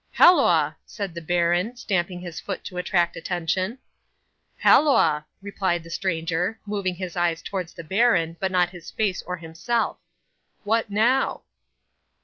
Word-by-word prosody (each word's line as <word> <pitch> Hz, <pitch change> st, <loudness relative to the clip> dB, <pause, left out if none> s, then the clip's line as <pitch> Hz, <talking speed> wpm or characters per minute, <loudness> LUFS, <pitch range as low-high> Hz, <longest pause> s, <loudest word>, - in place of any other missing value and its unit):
'"Halloa!" 355 Hz, +1 st, +5 dB
said 200 Hz, -5 st, -6 dB
the 170 Hz, -, -6 dB
baron, 175 Hz, +6 st, +1 dB
stamping 185 Hz, -5 st, -2 dB
his 175 Hz, -3 st, -7 dB
foot 195 Hz, -, -5 dB
to 180 Hz, -, -8 dB
attract 175 Hz, -1 st, +1 dB
attention. 180 Hz, +6 st, -2 dB, 0.8 s
'"Halloa!" 155 Hz, -, +4 dB, 0.2 s
replied 190 Hz, -4 st, -1 dB
the 165 Hz, -, -12 dB
stranger, 175 Hz, +3 st, -1 dB
moving 200 Hz, -3 st, -2 dB
his 180 Hz, -1 st, -6 dB
eyes 170 Hz, -1 st, 0 dB
towards 185 Hz, -4 st, -4 dB
the 170 Hz, -, -8 dB
baron, 180 Hz, -3 st, +2 dB
but 190 Hz, -1 st, -1 dB
not 180 Hz, -1 st, +2 dB
his 175 Hz, -3 st, -10 dB
face 205 Hz, -5 st, -1 dB
or 180 Hz, 0 st, -3 dB
himself 170 Hz, +8 st, -2 dB, 0.6 s
"What 225 Hz, +1 st, +1 dB
now?" 235 Hz, +6 st, +1 dB
180 Hz, 135 wpm, -24 LUFS, 170-205 Hz, 0.8 s, Halloa